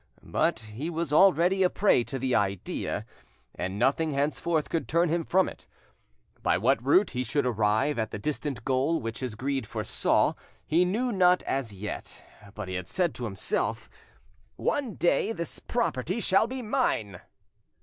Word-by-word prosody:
But 110 Hz, -, 0 dB
he 110 Hz, +9 st, -6 dB
was 165 Hz, -3 st, -3 dB
already 190 Hz, +2 st, +5 dB
a 185 Hz, -, +5 dB
prey 195 Hz, -, +3 dB
to 135 Hz, -, -5 dB
the 130 Hz, 0 st, -1 dB
idea, 100 Hz, -4 st, -1 dB, 0.5 s
and 95 Hz, +2 st, -4 dB
nothing 140 Hz, +6 st, +1 dB
henceforth 150 Hz, +3 st, 0 dB
could 165 Hz, -, -2 dB
turn 170 Hz, +1 st, +2 dB
him 165 Hz, +1 st, 0 dB
from 190 Hz, +3 st, +2 dB
it. -, -, -10 dB, 0.7 s
By -, -, +2 dB
what 120 Hz, +4 st, +2 dB
route 185 Hz, +10 st, +4 dB
he 125 Hz, 0 st, -2 dB
should 135 Hz, +3 st, 0 dB
arrive 110 Hz, +4 st, +1 dB
at 110 Hz, -, -1 dB
the -, -, -5 dB
distant 140 Hz, -1 st, -3 dB
goal 135 Hz, +5 st, +1 dB
which 115 Hz, 0 st, -5 dB
his 125 Hz, -5 st, -4 dB
greed 135 Hz, 0 st, -2 dB
foresaw, -, -, +1 dB, 0.3 s
he 170 Hz, +3 st, +3 dB
knew 235 Hz, +7 st, 0 dB
not 180 Hz, -3 st, +4 dB
as 135 Hz, -5 st, -2 dB
yet, 100 Hz, +1 st, -7 dB, 0.3 s
but 105 Hz, -3 st, -5 dB
he 95 Hz, -, -5 dB
had 90 Hz, -1 st, -4 dB
said 175 Hz, -, 0 dB
to 125 Hz, -, -5 dB
himself, 95 Hz, -4 st, -1 dB, 0.6 s
"One 270 Hz, -8 st, -1 dB
day 175 Hz, +5 st, +1 dB
this 170 Hz, -5 st, -3 dB
property 185 Hz, -, -1 dB
shall 200 Hz, +1 st, +3 dB
be 255 Hz, +1 st, -5 dB
mine." 115 Hz, -, -1 dB
140 Hz, 165 wpm, -28 LUFS, 115-180 Hz, 0.7 s, already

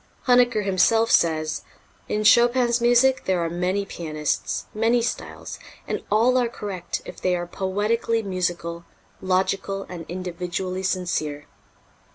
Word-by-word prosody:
Huneker 245 Hz, -4 st, +4 dB
himself 225 Hz, +4 st, +3 dB
says: 155 Hz, -2 st, +2 dB, 0.5 s
"In 210 Hz, -, 0 dB
Chopin's 240 Hz, +1 st, +4 dB
music 245 Hz, +2 st, +4 dB
there 185 Hz, -2 st, +1 dB
are 165 Hz, -, -3 dB
many 185 Hz, +3 st, -1 dB
pianists, 155 Hz, -5 st, -3 dB
many 225 Hz, +3 st, +2 dB
styles, 240 Hz, -, -5 dB, 0.3 s
and -, -, -2 dB
all 235 Hz, +5 st, +4 dB
are 240 Hz, -2 st, +1 dB
correct 195 Hz, -6 st, -5 dB
if -, -, -10 dB
they 185 Hz, -1 st, +2 dB
are 175 Hz, 0 st, -3 dB
poetically 210 Hz, +5 st, -1 dB
musical, 175 Hz, -3 st, -3 dB, 0.4 s
logical 195 Hz, +1 st, 0 dB
and 170 Hz, -3 st, -8 dB
individually 180 Hz, +1 st, -4 dB
sincere." 175 Hz, -6 st, -2 dB
190 Hz, 125 wpm, -24 LUFS, 175-230 Hz, 0.5 s, Huneker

